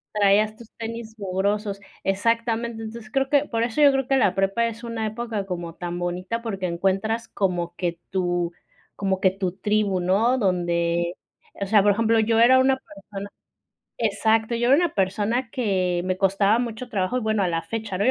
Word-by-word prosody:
Traías 210 Hz, +1 st, +3 dB
tus 230 Hz, -1 st, -14 dB
tenis 225 Hz, -1 st, -6 dB
mugrosos, 200 Hz, +1 st, -1 dB, 0.2 s
exactamente. 230 Hz, +3 st, 0 dB
Entonces, 220 Hz, 0 st, -8 dB
creo 270 Hz, 0 st, +1 dB
que, 290 Hz, 0 st, +3 dB
por 230 Hz, -4 st, -1 dB
eso 235 Hz, +5 st, -1 dB
yo 285 Hz, -, +8 dB
creo 270 Hz, -1 st, 0 dB
que 270 Hz, -, +2 dB
la 195 Hz, -7 st, +3 dB
prepa 195 Hz, +4 st, +1 dB
es 230 Hz, +1 st, -7 dB
una 230 Hz, -2 st, -3 dB
época 220 Hz, -2 st, -4 dB
como 175 Hz, -3 st, -5 dB
tan 175 Hz, 0 st, -5 dB
bonita, 180 Hz, +6 st, -3 dB
porque, 195 Hz, -5 st, -3 dB
encuentras 195 Hz, +6 st, -1 dB
como 175 Hz, -3 st, -1 dB
que 175 Hz, -2 st, -3 dB
tu 175 Hz, -2 st, 0 dB, 0.4 s
como 195 Hz, -2 st, -1 dB
que 190 Hz, -1 st, +3 dB
tu 190 Hz, -2 st, -3 dB
tribu, 205 Hz, -1 st, 0 dB
¿no?, 210 Hz, +8 st, +2 dB
donde, 170 Hz, -3 st, 0 dB, 0.4 s
o 200 Hz, -, -1 dB
sea, 205 Hz, +1 st, +5 dB
por 205 Hz, 0 st, +4 dB
ejemplo, 225 Hz, +1 st, +2 dB
yo 225 Hz, +1 st, +2 dB
era 255 Hz, +3 st, +7 dB
una 265 Hz, 0 st, +3 dB
persona 200 Hz, -4 st, -9 dB, 0.7 s
exacto, 220 Hz, +1 st, +1 dB
yo 240 Hz, +1 st, +1 dB
era 275 Hz, -, +7 dB
una 345 Hz, +2 st, +1 dB
persona 210 Hz, +6 st, 0 dB
que 185 Hz, -8 st, 0 dB
me 185 Hz, 0 st, -1 dB
costaba 195 Hz, +3 st, +3 dB
mucho 245 Hz, +1 st, -5 dB
trabajo 200 Hz, 0 st, -1 dB
y, -, -, -2 dB
bueno, 215 Hz, -2 st, +1 dB
a 180 Hz, -, +1 dB
la 165 Hz, -1 st, 0 dB
fecha, 220 Hz, -4 st, -4 dB
¿no?, 200 Hz, -, +1 dB
yo 255 Hz, -, +5 dB
210 Hz, 190 wpm, -24 LUFS, 190-230 Hz, 0.7 s, yo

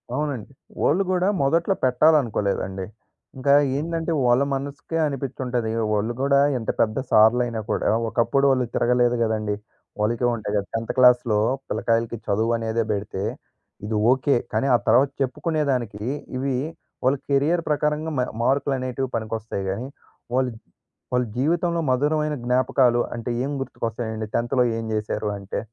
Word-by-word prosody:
అవునండి. 145 Hz, -6 st, -3 dB, 0.3 s
వాళ్ళు 185 Hz, +7 st, +3 dB
కూడా 185 Hz, 0 st, +2 dB
మొదట్లో 165 Hz, +8 st, +2 dB
పెట్టాలనుకోలేదండి. 115 Hz, -9 st, +2 dB, 0.5 s
ఇంకా 140 Hz, +2 st, +3 dB, 0.3 s
ఏందంటే 165 Hz, +1 st, -2 dB
వాళ్ళ 120 Hz, +2 st, +4 dB
మనసుకే 140 Hz, +4 st, -4 dB
అనిపించి 135 Hz, -2 st, -5 dB
ఉంటది. 120 Hz, -3 st, -1 dB, 0.2 s
వాళ్ళు 105 Hz, +3 st, 0 dB
కూడా 140 Hz, 0 st, +4 dB, 0.2 s
ఎంత 115 Hz, -, -5 dB
పెద్ద 110 Hz, -1 st, +2 dB
సార్లైనా 115 Hz, +1 st, +4 dB
కూడా -, -, +1 dB, 0.2 s
ఒకప్పుడు 130 Hz, +4 st, +2 dB
వాళ్ళు 130 Hz, -2 st, +2 dB
తిరగలేదు 120 Hz, 0 st, +3 dB
గదండీ, 110 Hz, -2 st, -1 dB, 0.4 s
వాళ్ళకీ 115 Hz, +3 st, +1 dB
ఉంటాయి 105 Hz, -2 st, -4 dB
కద. 100 Hz, -, -1 dB
టెంత్ 115 Hz, 0 st, -2 dB
క్లాస్‌లో 125 Hz, -4 st, +5 dB, 0.3 s
పిల్లకాయలకి 115 Hz, +1 st, 0 dB
చదువు 110 Hz, +3 st, +1 dB
అనేదే 115 Hz, 0 st, -1 dB
పెడితే, 100 Hz, -1 st, -3 dB, 0.6 s
ఇది 110 Hz, +1 st, -2 dB, 0.2 s
ఓకె. 135 Hz, +1 st, +2 dB, 0.2 s
కానీ 110 Hz, +5 st, +1 dB
ఆ -, -, +5 dB
తర్వాత 125 Hz, +5 st, +5 dB
చెప్పుకునేదానికి 135 Hz, -6 st, -1 dB, 0.3 s
ఇవి 135 Hz, 0 st, -1 dB, 0.5 s
వాళ్ళ 130 Hz, +2 st, +3 dB
కెరియర్ 145 Hz, +5 st, +2 dB
ప్రకారంగా 150 Hz, +1 st, 0 dB
మా -, -, +3 dB, 0.2 s
మార్కులనేటివి 130 Hz, -1 st, 0 dB
పనికొస్తాయి 110 Hz, -2 st, -4 dB
గానీ. 115 Hz, +7 st, -4 dB, 0.5 s
వాళ్ళు 130 Hz, -1 st, +1 dB, 0.6 s
వాళ్ళ 125 Hz, 0 st, +2 dB
జీవితంలో 170 Hz, +6 st, +1 dB
మధురమైన 150 Hz, +3 st, +1 dB
జ్ఞాపకాలు 125 Hz, 0 st, +3 dB
అంటే 120 Hz, 0 st, -5 dB
ఏం 140 Hz, -, -2 dB
గుర్తుకొస్తాయండి? 110 Hz, -3 st, -4 dB
టెన్త్‌లో 120 Hz, +2 st, +2 dB, 0.2 s
ఏం -, -, -4 dB
చేశారు 105 Hz, 0 st, -2 dB
అంటే? 100 Hz, 0 st, -5 dB
125 Hz, 130 wpm, -23 LUFS, 110-140 Hz, 0.6 s, క్లాస్‌లో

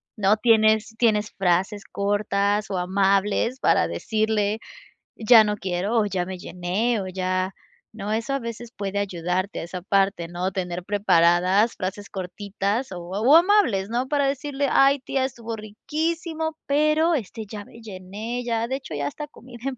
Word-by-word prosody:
¿no 210 Hz, 0 st, +3 dB
tienes 220 Hz, -1 st, +3 dB
tienes 215 Hz, -3 st, +2 dB
frases 190 Hz, +2 st, 0 dB
cortas 205 Hz, 0 st, 0 dB
o 195 Hz, -, -2 dB
amables?, 195 Hz, +6 st, +1 dB
para -, -, +3 dB
decirle: 215 Hz, -1 st, 0 dB, 0.6 s
"Ya 225 Hz, 0 st, +7 dB
no 210 Hz, 0 st, -1 dB
quiero, 190 Hz, +4 st, -1 dB
o 210 Hz, -, +2 dB
ya 185 Hz, -3 st, -1 dB
me 185 Hz, 0 st, -6 dB
llené, 190 Hz, +7 st, -1 dB
o 190 Hz, -, -5 dB
ya", 185 Hz, 0 st, -1 dB, 0.4 s
¿no?, 210 Hz, -1 st, -4 dB
eso 230 Hz, +5 st, -1 dB
a -, -, -1 dB
veces 235 Hz, -1 st, -7 dB
puede 200 Hz, -2 st, -3 dB
ayudarte 185 Hz, 0 st, -2 dB
a -, -, -5 dB
esa 180 Hz, +2 st, -6 dB
parte, 195 Hz, -2 st, +1 dB
¿no?, 175 Hz, +2 st, -3 dB
tener 180 Hz, -2 st, -4 dB
preparadas 190 Hz, +1 st, +3 dB
frases 200 Hz, +2 st, -5 dB
cortitas 200 Hz, +4 st, -3 dB
o 180 Hz, -, -6 dB
o 220 Hz, -, +4 dB
amables, 335 Hz, -, +4 dB
¿no?, 245 Hz, +3 st, -1 dB
para 285 Hz, 0 st, +1 dB
decirle: 280 Hz, 0 st, -1 dB
"Ay, 275 Hz, +1 st, +5 dB
tía, 260 Hz, 0 st, -1 dB
estuvo 235 Hz, -3 st, -5 dB
riquísimo, 320 Hz, -, -3 dB
pero 305 Hz, +3 st, +3 dB
este, 225 Hz, -3 st, -5 dB
ya 205 Hz, -2 st, -7 dB
me 230 Hz, -, -15 dB
llené, 215 Hz, +4 st, -6 dB
ya, 230 Hz, -1 st, -1 dB
de 260 Hz, -, -2 dB
hecho, 260 Hz, -, -10 dB
ya 145 Hz, -1 st, -2 dB
hasta 295 Hz, -, -6 dB
comí 250 Hz, -3 st, -14 dB
de 265 Hz, +4 st, -3 dB
más". 255 Hz, -, -9 dB
210 Hz, 165 wpm, -24 LUFS, 190-240 Hz, 0.6 s, Ya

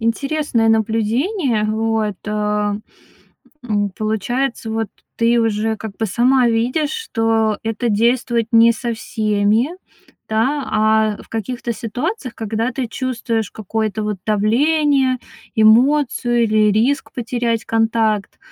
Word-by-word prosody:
интересное 235 Hz, 0 st, 0 dB
наблюдение, 225 Hz, -, +1 dB
вот, 220 Hz, -2 st, -1 dB
э, 210 Hz, -, -3 dB, 1.3 s
м. 205 Hz, -3 st, 0 dB
Получается 225 Hz, +3 st, -2 dB
вот, 225 Hz, -1 st, -2 dB, 0.3 s
ты 235 Hz, 0 st, +3 dB
уже 220 Hz, 0 st, 0 dB
как 215 Hz, -2 st, -8 dB
бы 220 Hz, -, -1 dB
сама 245 Hz, +5 st, +3 dB
видишь, 250 Hz, +7 st, 0 dB
что 225 Hz, -, 0 dB
это 225 Hz, +1 st, -2 dB
действует 235 Hz, +1 st, +1 dB
не 230 Hz, +1 st, +6 dB
со 235 Hz, 0 st, -3 dB
всеми, 215 Hz, +2 st, +1 dB, 0.6 s
да, 260 Hz, +7 st, 0 dB, 0.5 s
а -, -, -12 dB
в -, -, -20 dB
каких-то 235 Hz, +2 st, -4 dB
ситуациях, 255 Hz, -, -4 dB
когда 225 Hz, +2 st, -2 dB
ты 255 Hz, -1 st, -2 dB
чувствуешь 230 Hz, -3 st, -2 dB
какое-то 215 Hz, 0 st, -3 dB
вот 210 Hz, -3 st, -2 dB
давление, 260 Hz, +5 st, +2 dB, 0.4 s
эмоцию 240 Hz, +1 st, +4 dB
или 215 Hz, -1 st, +3 dB
риск 255 Hz, +7 st, +1 dB
потерять 235 Hz, -1 st, -2 dB
контакт. 225 Hz, -2 st, 0 dB
225 Hz, 115 wpm, -19 LUFS, 220-250 Hz, 1.3 s, не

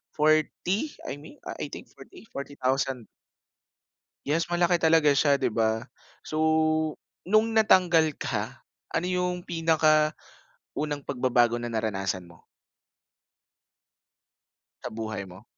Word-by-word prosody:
40? 155 Hz, -, +1 dB
I 140 Hz, -, -6 dB
mean, 155 Hz, -, -13 dB
I -, -, -5 dB
think -, -, -10 dB
40, 370 Hz, -, -15 dB
40,000.. 135 Hz, -3 st, -2 dB, 1.2 s
Yes, 165 Hz, +3 st, +1 dB
malaki 175 Hz, 0 st, +3 dB
talaga 160 Hz, -1 st, +5 dB
siya, 140 Hz, 0 st, +3 dB
'di 130 Hz, -, +1 dB
ba? 110 Hz, +2 st, 0 dB, 0.4 s
So, 155 Hz, -, -5 dB, 0.9 s
nung 215 Hz, +4 st, +2 dB
natanggal 175 Hz, -8 st, +4 dB
ka, -, -, -4 dB, 0.2 s
ano 175 Hz, -, -1 dB
yung 180 Hz, -1 st, -1 dB
pinakaunang 155 Hz, -2 st, +2 dB, 0.8 s
pagbabago 125 Hz, -3 st, +2 dB
na 120 Hz, -1 st, -4 dB
naranasan 95 Hz, -5 st, -2 dB
mo? 85 Hz, -1 st, -18 dB, 2.4 s
Sa -, -, -5 dB
buhay 110 Hz, -3 st, -5 dB
mo? 95 Hz, +3 st, -13 dB
150 Hz, 105 wpm, -27 LUFS, 120-170 Hz, 2.4 s, talaga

